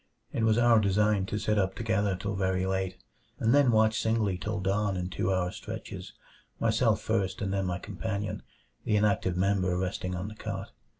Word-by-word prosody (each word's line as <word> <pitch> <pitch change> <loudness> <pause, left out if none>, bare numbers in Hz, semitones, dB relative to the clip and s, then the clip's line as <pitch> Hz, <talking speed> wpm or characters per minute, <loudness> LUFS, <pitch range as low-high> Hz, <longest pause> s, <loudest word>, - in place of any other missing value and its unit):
It - - -1
was 110 0 +4
our 120 -1 +5
design 100 -1 +2
to 105 - -2
sit 105 0 +1
up 95 -1 0
together 105 -4 0
till 100 +3 -3
very 95 -1 0
late, 95 -1 -1 0.4
and 115 +2 +2
then 145 -2 +5
watch 110 0 +3
singly 110 -4 +1
till 105 +3 -3
dawn 100 +1 0
in 90 0 -3
two 95 - 0
hour 90 -1 0
stretches, - - -7 0.5
myself - - +2
first 95 -2 -1
and 100 -1 -2
then 95 -1 0
my 90 -1 -1
companion; 105 +1 -4 0.4
the 105 - +1
inactive 100 -4 +2
member 95 -1 +1
resting 90 0 -2
on 90 +3 -4
the 110 - -7
cot. 100 -2 -6
100 Hz, 185 wpm, -29 LUFS, 95-110 Hz, 0.5 s, our